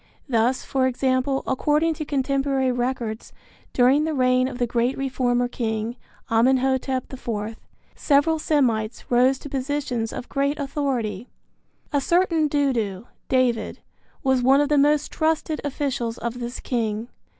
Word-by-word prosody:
Thus, 245 Hz, 0 st, +1 dB
for 260 Hz, -1 st, +1 dB
example, 260 Hz, +1 st, 0 dB
according 300 Hz, +5 st, +1 dB
to 305 Hz, -1 st, -5 dB
contemporary 270 Hz, -1 st, 0 dB
records, 240 Hz, -3 st, -3 dB, 0.4 s
during 260 Hz, +4 st, +4 dB
the 315 Hz, -1 st, -1 dB
reign 255 Hz, -1 st, +3 dB
of 260 Hz, -, -6 dB
the 245 Hz, -, +1 dB
great 240 Hz, +2 st, 0 dB
reformer 250 Hz, -2 st, 0 dB
king, 225 Hz, -1 st, -3 dB, 0.4 s
Amenhotep 260 Hz, +2 st, +1 dB
IV, 225 Hz, -4 st, -4 dB, 0.4 s
several 305 Hz, +2 st, +2 dB
Semites 240 Hz, -9 st, 0 dB
rose 255 Hz, +2 st, +4 dB
to 285 Hz, -, -10 dB
positions 265 Hz, -4 st, -2 dB
of 245 Hz, -, -6 dB
great 280 Hz, +1 st, 0 dB
authority. 255 Hz, -7 st, -2 dB, 0.6 s
A 285 Hz, -, +2 dB
certain 335 Hz, 0 st, +2 dB
Dudu 240 Hz, -9 st, 0 dB, 0.2 s
(David) 250 Hz, -4 st, +1 dB, 0.5 s
was 265 Hz, -1 st, +2 dB
one 265 Hz, +3 st, +5 dB
of 290 Hz, 0 st, +2 dB
the 295 Hz, -, +3 dB
most 295 Hz, +1 st, +2 dB
trusted 315 Hz, -1 st, 0 dB
officials 265 Hz, -5 st, -2 dB
of 235 Hz, +1 st, -4 dB
this 240 Hz, +1 st, -5 dB
king. 225 Hz, -2 st, -2 dB
260 Hz, 135 wpm, -23 LUFS, 240-285 Hz, 0.6 s, one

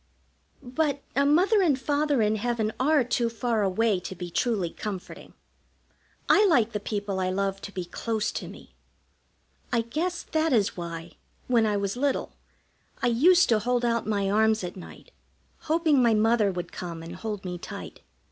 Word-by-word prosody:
But 285 Hz, +2 st, -1 dB
a 280 Hz, +1 st, +3 dB
Mother 375 Hz, +8 st, +4 dB
and 300 Hz, -8 st, +2 dB
Father 290 Hz, -3 st, +1 dB
in 215 Hz, +1 st, +1 dB
heaven 220 Hz, -1 st, -1 dB
are 290 Hz, +1 st, +3 dB
too 240 Hz, -1 st, 0 dB
far 230 Hz, -1 st, -1 dB
away 200 Hz, +1 st, +1 dB
to 185 Hz, +1 st, -7 dB
be 175 Hz, -1 st, -7 dB
truly 200 Hz, -6 st, 0 dB
comforting. 200 Hz, -4 st, -7 dB, 0.9 s
I 410 Hz, -, +6 dB
like 240 Hz, -, +3 dB
the 210 Hz, -, -2 dB
people 205 Hz, -2 st, -3 dB
I 185 Hz, 0 st, 0 dB
love 195 Hz, +1 st, -1 dB
to 200 Hz, -, -7 dB
be 185 Hz, -3 st, -5 dB
close 220 Hz, +4 st, -2 dB
to -, -, -5 dB
me. -, -, -13 dB, 1.0 s
I 235 Hz, -1 st, +2 dB
guess 325 Hz, +10 st, -3 dB
that 315 Hz, -2 st, 0 dB
is 210 Hz, -4 st, +2 dB
why, 170 Hz, -1 st, -7 dB, 0.3 s
when 235 Hz, -3 st, +3 dB
I 210 Hz, -1 st, +1 dB
was 200 Hz, +1 st, -2 dB
little, 275 Hz, +2 st, -1 dB, 0.7 s
I -, -, +4 dB
used 345 Hz, +10 st, +5 dB
to 225 Hz, -2 st, +4 dB
hold 245 Hz, +2 st, 0 dB
out 235 Hz, -2 st, 0 dB
my 200 Hz, -2 st, 0 dB
arms 220 Hz, +1 st, +2 dB
at 175 Hz, -, -5 dB
night, 185 Hz, -, -12 dB, 0.5 s
hoping 315 Hz, -3 st, +3 dB
my 235 Hz, -2 st, +4 dB
Mother 215 Hz, -1 st, +3 dB
would 175 Hz, -1 st, -5 dB
come 170 Hz, -2 st, -6 dB
and 170 Hz, +2 st, -8 dB
hold 210 Hz, 0 st, -5 dB
me 180 Hz, -1 st, -4 dB
tight. -, -, -8 dB
225 Hz, 175 wpm, -26 LUFS, 195-260 Hz, 1.0 s, I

